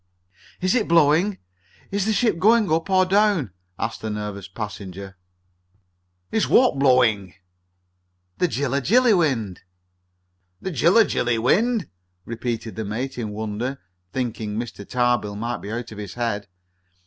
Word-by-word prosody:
"Is 185 +2 +2
it 240 -4 +1
blowing? 165 +4 +3 0.5
Is 200 -1 0
the - - +2
ship 220 -4 +1
going 215 -1 +4
up 165 +4 0
or 185 -1 +4
down?" 195 - +2 0.3
asked 115 0 -4
the 110 - -4
nervous 105 -2 -5
passenger. 100 -1 -7 1.2
"Is 220 - +1
what 245 - +4
blowing?" 120 -8 +3 1.0
"The 180 - +3
Jilla 140 -2 -1
Jilly 235 - +4
wind!" 125 - 0 1.0
"The 190 - -4
Jilla 180 - +4
Jilly 120 -1 0
wind?" 210 - +2 0.4
repeated 115 -1 -4
the 110 - -2
mate 125 +6 -4
in 110 -3 -3
wonder, 110 +5 -4 0.3
thinking 115 -4 -3
Mr. 110 -4 -6
Tarbill 120 -4 +1
might 115 +3 -3
be 100 - -7
out 120 0 -5
of 105 - -9
his 100 -2 -7
head. 115 -4 -2
125 Hz, 135 wpm, -23 LUFS, -, 1.2 s, going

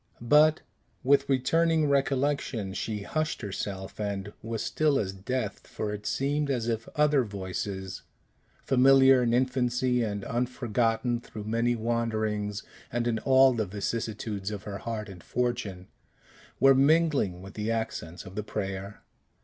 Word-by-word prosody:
But, 155 +2 +6 0.4
with 140 +1 +3
returning 155 +4 +2
recollection, 135 -7 0
she 105 0 -3
hushed 155 +8 -2
herself, 95 -1 -5
and 100 -1 -3
was 115 0 -3
still 140 +6 +2
as 95 -5 -1
death. 105 +2 -4
For 105 -1 -4
it 105 0 -6
seemed 145 +2 0
as 120 -4 -1
if 115 -1 -2
other 150 -3 +4
voices 95 -2 -5 0.6
familiar 135 0 +6
in 120 -1 +1
infancy, 125 0 +1
and 100 -3 -2
unforgotten 120 -1 0
through 110 -2 -8
many 115 +3 +1
wanderings, 110 -3 -1 0.3
and 120 0 -1
in 115 -2 0
all 130 +1 +5
the 110 -3 -1
vicissitudes 105 0 -3
of 105 -2 -6
her 100 -1 -6
heart 110 -2 -4
and 95 -3 -10
fortune 120 -7 -2 0.7
were 135 0 +7
mingling 140 - +3
with 95 - -10
the 105 +1 -3
accents 110 -7 -3
of 95 - -10
the 105 - -2
prayer. 100 -1 -5
115 Hz, 140 wpm, -28 LUFS, 105-130 Hz, 0.7 s, were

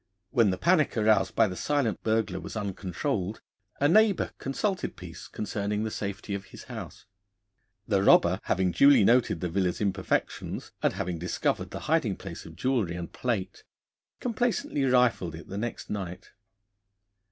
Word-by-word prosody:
When 115 -4 +4
the 95 - -1
panic 165 - +2
aroused 110 0 +3
by 115 - +5
the 90 - -5
silent 140 -1 0
burglar 110 -2 0
was - - -8
uncontrolled, 100 - -3 0.4
a 145 - +4
neighbour 210 +4 +4
consulted 185 +8 -2
Peace 90 -3 -10
concerning 105 0 -2
the 110 - -2
safety 100 0 -4
of 100 -1 -4
his - - -12
house. - - -9 0.8
The 100 -3 +2
robber, 95 -1 +5
having 90 0 +1
duly 140 +2 +6
noted 115 -6 +3
the 90 - 0
villa's 90 +1 0
imperfections, 95 -2 -2
and - - +2
having 90 -2 -3
discovered 90 +2 -1
the - - -7
hiding - - +1
place - - -8
of - - -12
jewellery 120 -10 0
and 85 -1 -6
plate, 115 -7 -3 0.6
complacently 235 - 0
rifled 125 -10 +2
it 85 - -11
the 100 - -5
next 120 +2 -4
night. 95 -4 -5
105 Hz, 150 wpm, -28 LUFS, 95-130 Hz, 0.8 s, duly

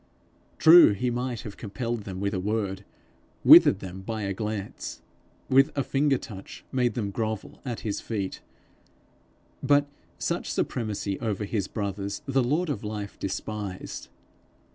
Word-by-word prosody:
True, 165 -8 +8
he 120 +5 -1
might 125 -1 -3
have 105 - -9
compelled 115 0 -4
them 95 -1 -6
with 100 +1 -1
a 95 - -1
word, 100 -1 -2 0.6
withered 100 - +8
them 95 0 -7
by 110 +2 -4
a 100 -1 -1
glance, 105 0 -5 0.4
with 135 +1 +5
a 140 - +2
finger 140 0 +2
touch 100 -7 -10
made 125 -2 +1
them 105 -5 -2
grovel 110 0 -4
at 120 -4 -4
his 105 -3 -3
feet; 100 -4 -4 1.2
but 145 0 +3 0.3
such - - -2
supremacy 105 -4 -2
over 105 -3 -2
his 100 -2 -2
brothers 100 +1 -4
the 135 -2 +2
Lord 155 +8 0
of 120 - -4
life 105 -1 -5
despised. 100 -1 -5
110 Hz, 140 wpm, -27 LUFS, 100-125 Hz, 1.2 s, True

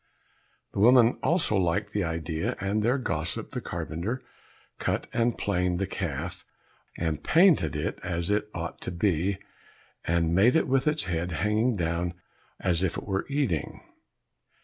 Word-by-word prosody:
The - - -3
woman 120 +2 +6
also 165 -10 +2
liked 95 +3 0
the 100 - +1
idea, 80 -1 -2
and 100 +3 0
their 120 +5 +2
gossip 80 - -3
the - - -4
carpenter 95 +11 -3 0.6
cut - - -1
and 120 0 +1
planed 90 -3 0
the 100 - 0
calf, 85 -1 -4 0.5
and 80 -3 -2
painted 155 - +4
it 75 - -2
as 85 +2 -2
it 105 +1 0
ought 85 -2 -5
to - - -4
be, 90 +1 +1 0.7
and 85 0 +1
made 105 - +5
it 160 - +3
with 135 +2 +2
its 150 0 +1
head 90 -2 -2
hanging 105 - +1
down 85 0 -1 0.4
as 90 -3 +1
if 95 -3 0
it - - -6
were 95 -1 -2
eating. 135 - -1
95 Hz, 150 wpm, -27 LUFS, 85-110 Hz, 0.7 s, woman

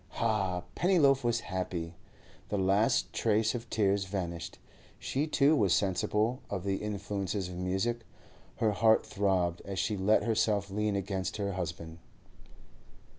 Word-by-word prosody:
Ha! 100 -6 0
Pennyloaf 145 -8 +3
was 120 -1 +1
happy! 85 -2 -4 0.6
The 105 - -1
last 100 +5 +2
trace 110 0 +2
of 120 -1 -6
tears 100 -2 +1
vanished. 85 -4 -4 0.4
She 145 +4 -2
too 150 0 +4
was 100 - +3
sensible 105 +5 0
of 95 -3 -3
the 100 -1 0
influences 100 -2 -3
of 90 - -7
music; 95 +6 -1 0.6
her 110 -2 +1
heart 110 +2 +3
throbbed 95 -5 0
as 95 -1 -6
she 105 - 0
let 100 +3 +3
herself 105 -3 +1
lean 105 0 0
against 95 0 -2
her 100 -1 -2
husband. 85 -3 -5
100 Hz, 135 wpm, -30 LUFS, 95-110 Hz, 0.6 s, too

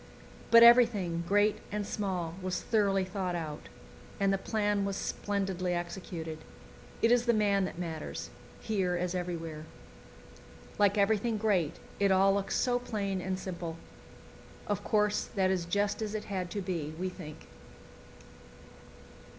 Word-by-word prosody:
But 230 0 +9
everything, 220 -8 +5
great 205 +2 +3
and 210 0 -2
small, 185 -6 -2
was 185 -1 -2
thoroughly 200 -4 +1
thought 185 -2 -3
out, 155 -3 -5 0.5
and 195 0 +3
the 195 - 0
plan 205 -2 0
was 200 0 -2
splendidly 190 -3 -2
executed. 170 -2 -5 0.6
It 230 - +5
is 245 0 +3
the 235 - +4
man 200 -2 +2
that - - -6
matters, 165 -3 -5 0.3
here 190 -5 0
as 175 0 -1
everywhere. 165 -4 -4 1.2
Like 205 0 +4
everything 215 +2 +2
great, 200 -7 +1 0.2
it 200 -1 +3
all 195 +1 +5
looks 200 0 -1
so 245 -1 +2
plain 200 -6 -2
and 190 0 -2
simple. 170 -3 -5 0.9
Of 205 -2 -2
course, 210 -1 +1
that 190 -1 +2
is 180 -3 0
just 205 +4 0
as 215 0 -3
it 215 - -3
had 185 -3 -3
to 205 +2 -3
be, 165 -5 -3
we 185 +2 -2
think. 170 -5 -9
195 Hz, 140 wpm, -31 LUFS, 180-210 Hz, 1.2 s, But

